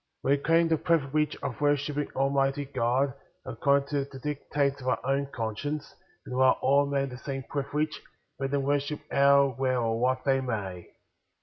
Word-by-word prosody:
11. 140 Hz, +2 st, +3 dB
We -, -, -16 dB
claim 165 Hz, +1 st, +4 dB
the 165 Hz, -1 st, +2 dB
privilege 150 Hz, -2 st, +1 dB
of 140 Hz, -1 st, -4 dB
worshiping 145 Hz, 0 st, +1 dB
Al 135 Hz, +1 st, +1 dB
mighty 135 Hz, +1 st, +1 dB
God 130 Hz, 0 st, 0 dB, 0.3 s
according 140 Hz, 0 st, +1 dB
to 140 Hz, -2 st, 0 dB
the 140 Hz, -1 st, -11 dB
dictates 140 Hz, 0 st, -2 dB
of 130 Hz, -, -7 dB
our 130 Hz, -, +1 dB
own 135 Hz, +1 st, 0 dB
conscience, 140 Hz, +4 st, -4 dB, 0.3 s
and -, -, -7 dB
allow 130 Hz, 0 st, +5 dB
all 140 Hz, +1 st, +2 dB
men 140 Hz, -1 st, 0 dB
the 125 Hz, 0 st, -9 dB
same 135 Hz, 0 st, -5 dB
privilege, 150 Hz, +3 st, -2 dB, 0.4 s
let 135 Hz, 0 st, -1 dB
them 140 Hz, 0 st, 0 dB
worship 145 Hz, +1 st, -1 dB
how, 140 Hz, -1 st, +5 dB
where, 130 Hz, -1 st, +1 dB
or 115 Hz, -1 st, 0 dB
what 130 Hz, +1 st, +1 dB
they 135 Hz, -1 st, +3 dB
may. 100 Hz, -8 st, -4 dB
140 Hz, 180 wpm, -28 LUFS, 130-145 Hz, 0.4 s, allow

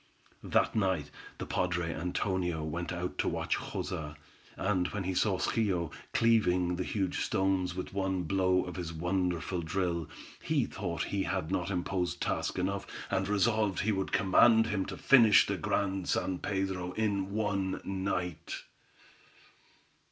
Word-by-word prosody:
That -, -, +2 dB
night 95 Hz, -9 st, 0 dB, 0.3 s
the -, -, -5 dB
padre 90 Hz, -2 st, -1 dB
Antonio 90 Hz, 0 st, -1 dB
went 85 Hz, +3 st, -3 dB
out 90 Hz, 0 st, -4 dB
to -, -, +1 dB
watch -, -, 0 dB
Joza, 75 Hz, -2 st, -4 dB, 0.4 s
and 95 Hz, -3 st, +1 dB
when 105 Hz, -2 st, -4 dB
he 95 Hz, +1 st, -1 dB
saw 95 Hz, +1 st, +2 dB
Schio 90 Hz, -7 st, 0 dB, 0.2 s
cleaving 90 Hz, -6 st, +3 dB
the 90 Hz, -, -1 dB
huge 95 Hz, -1 st, -1 dB
stones 95 Hz, -3 st, 0 dB
with 90 Hz, -, -5 dB
one 95 Hz, -2 st, 0 dB
blow 95 Hz, +1 st, +2 dB
of 90 Hz, -, -7 dB
his 85 Hz, -2 st, -4 dB
wonderful 90 Hz, +1 st, -1 dB
drill, 85 Hz, -1 st, -1 dB, 0.3 s
he 150 Hz, -5 st, +1 dB
thought 85 Hz, -5 st, -3 dB
he 100 Hz, -, +1 dB
had 95 Hz, -3 st, -2 dB
not 95 Hz, -1 st, -1 dB
imposed 90 Hz, -1 st, -1 dB
task -, -, -1 dB
enough, 95 Hz, +2 st, -1 dB, 0.2 s
and 95 Hz, -1 st, +1 dB
resolved 105 Hz, 0 st, +2 dB
he 110 Hz, -, +1 dB
would 95 Hz, -2 st, -1 dB
command 110 Hz, +3 st, +5 dB
him 100 Hz, -2 st, -1 dB
to -, -, -6 dB
finish 115 Hz, -6 st, +6 dB
the -, -, -1 dB
Grand 95 Hz, -2 st, -1 dB
San 95 Hz, -1 st, 0 dB
Pedro 95 Hz, -2 st, -2 dB
in 100 Hz, -2 st, 0 dB
one 100 Hz, -3 st, -1 dB
night. 90 Hz, -4 st, -3 dB
95 Hz, 145 wpm, -31 LUFS, 90-100 Hz, 0.4 s, finish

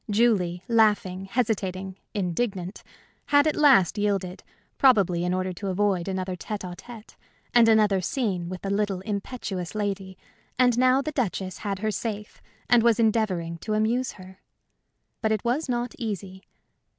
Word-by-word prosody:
Julie, 200 Hz, -5 st, +2 dB
laughing, 205 Hz, -5 st, +2 dB
hesitating, 195 Hz, -4 st, -2 dB, 0.2 s
indignant, 190 Hz, 0 st, -2 dB, 0.5 s
had 285 Hz, 0 st, +5 dB
at 310 Hz, -, +1 dB
last 250 Hz, -, +5 dB
yielded 195 Hz, -3 st, -1 dB, 0.4 s
probably 195 Hz, -10 st, +4 dB
in 180 Hz, -, 0 dB
order 185 Hz, 0 st, -1 dB
to 195 Hz, +3 st, -6 dB
avoid 190 Hz, -2 st, 0 dB
another 185 Hz, -1 st, -3 dB
tête 200 Hz, +1 st, -5 dB
à 175 Hz, -, -7 dB
tête 230 Hz, +2 st, -12 dB, 0.4 s
and 235 Hz, -1 st, +6 dB
another 210 Hz, -3 st, +4 dB
scene 185 Hz, -4 st, -2 dB
with 185 Hz, -1 st, -7 dB
the 195 Hz, -, -2 dB
little, 200 Hz, -2 st, 0 dB
impetuous 200 Hz, -2 st, -4 dB
lady, 195 Hz, -3 st, -3 dB, 0.4 s
and 250 Hz, -2 st, +4 dB
now 255 Hz, +2 st, +3 dB
the 310 Hz, -, -3 dB
Duchess 190 Hz, -, -2 dB
had 200 Hz, -2 st, -3 dB
her 215 Hz, +2 st, -1 dB
safe 210 Hz, 0 st, -5 dB, 0.3 s
and 240 Hz, -1 st, +5 dB
was 235 Hz, 0 st, +3 dB
endeavoring 195 Hz, -7 st, 0 dB
to 215 Hz, +4 st, -2 dB
amuse 235 Hz, +4 st, 0 dB
her. 185 Hz, -1 st, -14 dB, 0.8 s
But 220 Hz, -, +1 dB
it 215 Hz, 0 st, -1 dB
was 260 Hz, +5 st, 0 dB
not 240 Hz, -1 st, -1 dB
easy. 195 Hz, -4 st, -5 dB
205 Hz, 150 wpm, -25 LUFS, 185-230 Hz, 0.8 s, and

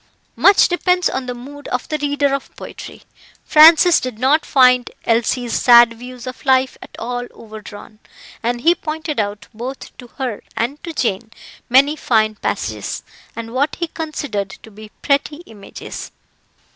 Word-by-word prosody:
Much 395 Hz, 0 st, +5 dB
depends 360 Hz, +1 st, +1 dB
on 260 Hz, -1 st, -4 dB
the 250 Hz, -, -4 dB
mood 285 Hz, +4 st, -11 dB
of 250 Hz, -, -3 dB
the 305 Hz, -, -1 dB
reader 285 Hz, -1 st, 0 dB
of 275 Hz, -, -3 dB
poetry. -, -, -10 dB, 0.4 s
Francis 325 Hz, +2 st, +7 dB
did 255 Hz, -4 st, -5 dB
not 275 Hz, +6 st, +2 dB
find 250 Hz, -2 st, +4 dB, 0.2 s
Elsie's 235 Hz, +1 st, 0 dB
sad 235 Hz, -1 st, +6 dB
views 245 Hz, +1 st, -10 dB
of 255 Hz, 0 st, -8 dB
life 260 Hz, -1 st, +2 dB
at -, -, -11 dB
all 245 Hz, +1 st, -4 dB
overdrawn, 215 Hz, -1 st, -12 dB, 0.4 s
and 240 Hz, +1 st, -2 dB
he 335 Hz, +5 st, +5 dB
pointed 315 Hz, -4 st, -4 dB
out 205 Hz, 0 st, -3 dB
both 250 Hz, +5 st, -8 dB
to 245 Hz, -, -11 dB
her 255 Hz, -6 st, -4 dB, 0.2 s
and 265 Hz, +6 st, -2 dB
to 340 Hz, -, -5 dB
Jane 225 Hz, -7 st, -2 dB, 0.4 s
many 275 Hz, +4 st, +4 dB
fine 220 Hz, -7 st, +1 dB
passages, 210 Hz, -, -4 dB, 0.3 s
and 230 Hz, 0 st, -7 dB
what 285 Hz, +3 st, 0 dB
he 345 Hz, -, -2 dB
considered 290 Hz, -, -4 dB
to 220 Hz, -, -14 dB
be 215 Hz, +1 st, -12 dB
pretty 295 Hz, +3 st, 0 dB
images. 205 Hz, -3 st, -10 dB
255 Hz, 155 wpm, -18 LUFS, 230-290 Hz, 0.4 s, Francis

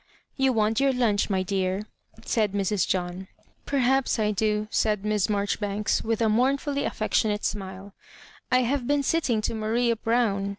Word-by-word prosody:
"You 265 Hz, -1 st, +2 dB
want 220 Hz, -2 st, +1 dB
your 275 Hz, -1 st, +3 dB
lunch, 220 Hz, -5 st, +1 dB
my 190 Hz, -2 st, +1 dB
dear," 190 Hz, +1 st, -1 dB, 0.4 s
said 215 Hz, -4 st, 0 dB
Mrs. 200 Hz, 0 st, 0 dB
John. 180 Hz, +1 st, -2 dB, 0.2 s
" -, -, -32 dB, 0.2 s
Perhaps 270 Hz, -1 st, +2 dB
I 215 Hz, -1 st, +1 dB
do," 210 Hz, +1 st, 0 dB
said 210 Hz, -2 st, 0 dB
Miss 210 Hz, -2 st, +1 dB
Maijoribanks, 205 Hz, 0 st, -1 dB
with 225 Hz, 0 st, -1 dB
a -, -, +3 dB
mournfully 275 Hz, +5 st, +1 dB
affectionate 210 Hz, 0 st, 0 dB
smile. 190 Hz, -1 st, -5 dB, 0.3 s
" -, -, -24 dB
I 255 Hz, 0 st, +4 dB
have 250 Hz, 0 st, -1 dB
been 290 Hz, 0 st, +2 dB
sitting 270 Hz, -8 st, +1 dB
to -, -, -2 dB
Maria 230 Hz, +2 st, 0 dB
Brown. 225 Hz, -4 st, 0 dB
215 Hz, 165 wpm, -26 LUFS, 200-245 Hz, 0.4 s, I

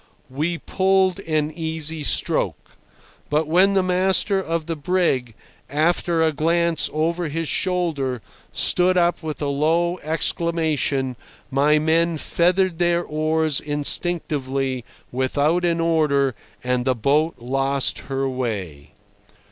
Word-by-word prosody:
We 160 Hz, +6 st, -1 dB
pulled 190 Hz, +1 st, +1 dB
an 155 Hz, -1 st, 0 dB
easy 160 Hz, -1 st, -3 dB
stroke; 145 Hz, -, 0 dB, 0.5 s
but 150 Hz, +1 st, +1 dB
when 185 Hz, +5 st, +4 dB
the 190 Hz, -1 st, +2 dB
master 190 Hz, +2 st, +2 dB
of 165 Hz, -3 st, -3 dB
the 165 Hz, 0 st, -3 dB
brig, 145 Hz, -, 0 dB, 0.3 s
after 165 Hz, +2 st, +1 dB
a 160 Hz, -, +3 dB
glance 165 Hz, +2 st, +1 dB
over 165 Hz, +2 st, -1 dB
his 165 Hz, +2 st, -3 dB
shoulder, 155 Hz, -, -1 dB, 0.3 s
stood 180 Hz, +1 st, +2 dB
up 175 Hz, 0 st, +2 dB
with 155 Hz, -2 st, -5 dB
a -, -, 0 dB
low 165 Hz, +5 st, +1 dB
exclamation, 155 Hz, -5 st, -1 dB, 0.3 s
my 145 Hz, +3 st, +3 dB
men 165 Hz, +2 st, +1 dB
feathered 180 Hz, +2 st, +1 dB
their 175 Hz, 0 st, +2 dB
oars 155 Hz, -1 st, 0 dB
instinctively, 140 Hz, -4 st, -1 dB, 0.3 s
without 145 Hz, +7 st, +1 dB
an 170 Hz, -1 st, +1 dB
order, 150 Hz, -5 st, +2 dB, 0.3 s
and 125 Hz, 0 st, 0 dB
the 130 Hz, 0 st, +1 dB
boat 150 Hz, +7 st, +1 dB
lost 135 Hz, +2 st, -1 dB
her 135 Hz, 0 st, -1 dB
way. 95 Hz, -, -4 dB
160 Hz, 120 wpm, -22 LUFS, 140-170 Hz, 0.5 s, when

